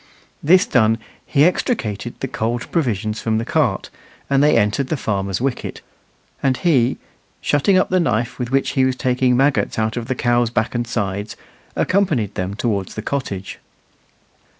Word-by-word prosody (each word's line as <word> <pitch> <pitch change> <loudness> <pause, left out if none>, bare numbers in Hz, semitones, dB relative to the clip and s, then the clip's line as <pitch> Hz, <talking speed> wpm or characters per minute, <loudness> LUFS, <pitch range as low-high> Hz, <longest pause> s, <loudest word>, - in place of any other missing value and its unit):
This 180 +6 +5
done, 110 -2 +3 0.3
he 145 +2 +4
extricated 120 - -1
the 135 - -1
cold 115 -1 -3
provisions 110 - -1
from 110 -1 0
the 115 - -2
cart, - - 0 0.4
and 135 0 +4
they 150 -4 +4
entered 105 +5 +1
the 155 - -1
farmer's 100 -5 -2
wicket; 135 0 -3 0.6
and 130 -2 +1
he, 135 -8 +2 0.4
shutting 150 +7 +2
up 185 - +1
the 185 - +3
knife 120 -7 0
with 125 -1 -2
which 135 +1 +1
he 135 -2 +2
was 130 -1 +2
taking 125 0 +1
maggots 135 +2 +1
out 110 +1 0
of 115 -1 -4
the 130 - -1
cow's 120 -1 +2
back 115 -1 -1
and 120 -1 -2
sides, 100 -2 -3 0.4
accompanied 155 - +1
them 95 +2 -3
towards 100 -4 -2
the 110 - -5
cottage. 100 -9 -4
120 Hz, 165 wpm, -20 LUFS, 110-135 Hz, 0.6 s, This